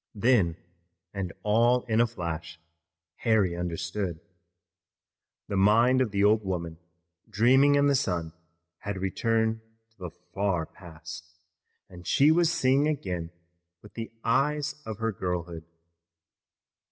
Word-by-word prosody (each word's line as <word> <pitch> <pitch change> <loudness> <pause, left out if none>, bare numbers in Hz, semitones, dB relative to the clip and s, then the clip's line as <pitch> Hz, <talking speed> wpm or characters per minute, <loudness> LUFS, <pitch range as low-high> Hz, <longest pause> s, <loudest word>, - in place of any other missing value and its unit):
Then, 105 -7 +2 0.6
and 95 -3 -4
all 120 +4 +3
in 115 -1 +1
a 120 - +3
flash, 85 -6 -6 0.6
Harry 105 -7 +2
understood. 85 +1 -3 1.3
The 100 - -2
mind 115 +6 +4
of 125 - +1
the 100 0 0
old 105 +1 +4
woman 85 -4 -4 0.5
dreaming 135 +6 +4
in 140 0 +3
the 140 - +3
sun 85 -10 -1 0.5
had 100 -1 -5
returned 110 +4 0 0.3
to 115 - -37
the 90 - -6 0.2
far 95 -5 0
past, 85 -1 -12 0.5
and 90 -2 -12
she 145 +3 +5
was 170 0 +3
seeing 135 0 +2
again 90 - -3 0.5
with 105 - -15
the 115 -1 -6
eyes 150 +2 +1
of 110 -2 -5
her 115 0 -1
girlhood. 90 -4 -4
100 Hz, 125 wpm, -27 LUFS, 85-120 Hz, 1.3 s, she